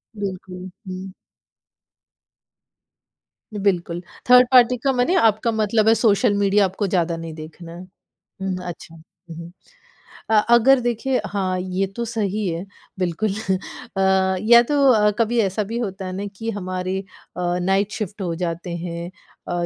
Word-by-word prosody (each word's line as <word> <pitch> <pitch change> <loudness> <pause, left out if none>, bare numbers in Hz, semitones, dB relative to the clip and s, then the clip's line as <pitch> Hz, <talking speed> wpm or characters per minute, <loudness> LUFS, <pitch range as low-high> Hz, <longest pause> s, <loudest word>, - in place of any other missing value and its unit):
बिल्कुल, 185 -2 -6 0.2
हुँ। 185 +1 -6 2.4
बिल्कुल, 180 -4 -1 0.3
third 250 0 +8
party 250 -1 +6
का 275 - +3
माने 250 +9 +1
आपका 225 - +3
मतलब 220 0 +1
है 225 - +7
सोशल 220 0 +3
मीडिया 200 0 +3
आपको 195 +2 -2
ज़्यादा 175 -3 0
नहीं 165 -1 -7
देखना। 160 +2 -10 0.7
हुँ, 190 -1 -2
अच्छा, 165 -1 -9
हुँ, 165 +1 -15
हुँ। 170 0 -9 0.8
अ, - - +1 0.2
अगर 260 +3 +5
देखिए 245 +2 -1
हाँ, 190 -2 -2
ये 185 +1 -2
तो 235 - -3
सही 215 -3 -2
है 170 +1 -3 0.3
बिल्कुल 185 +4 -1 0.7
अ, 190 0 +2
या 235 +2 +7
तो 270 - -3 0.2
अ, 210 -3 +4
कभी 230 +1 +2
ऐसा 200 +1 -1
भी 225 +4 -5
होता 195 -4 -4
है 185 - -4
ना 200 +2 -4
कि 225 +4 -5
हमारे 185 -2 -3 0.4
अ, - - -3 0.2
नाइट 195 +3 +1
शिफ्ट 210 -1 -5
हो 175 -3 -2
जाते 170 0 -4
हैं 170 0 -5 0.4
अ, 175 0 -1
195 Hz, 145 wpm, -21 LUFS, 180-220 Hz, 2.4 s, third